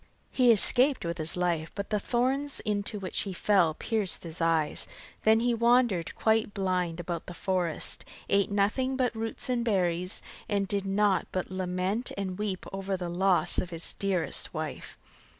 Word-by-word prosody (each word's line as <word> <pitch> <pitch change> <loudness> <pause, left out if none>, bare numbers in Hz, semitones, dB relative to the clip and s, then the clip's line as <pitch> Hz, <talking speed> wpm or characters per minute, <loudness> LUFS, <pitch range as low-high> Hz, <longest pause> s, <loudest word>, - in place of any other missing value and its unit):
He 250 -2 +5
escaped 250 +3 +3
with 170 +1 -3
his 155 +3 -3
life, 170 -3 0
but 200 +1 -5
the 210 - +2
thorns 265 +6 +1
into 210 +1 -1
which 190 -2 -2
he 195 - -1
fell 180 -5 +3
pierced 215 -2 -1
his 165 0 -7
eyes. 160 -2 +1 0.4
Then 220 +1 +5
he 240 0 +2
wandered 235 -6 +2
quite 220 -1 +1
blind 180 -3 -1
about 175 0 -4
the 175 - -7
forest, 180 -4 -1 0.2
ate 200 0 +2
nothing 215 +7 +1
but 255 -2 +1
roots 225 0 -3
and 245 -2 0
berries, 180 -4 0 0.3
and 200 -2 0
did 200 0 -1
naught 195 0 +2
but 185 0 -3
lament 185 +5 -2
and 190 -1 -3
weep 200 -3 -2
over 195 0 -2
the 180 -1 -4
loss 185 +1 +2
of 180 - -2
his 165 -1 -3
dearest 185 -6 0
wife. - - -5
195 Hz, 170 wpm, -29 LUFS, 180-220 Hz, 0.4 s, He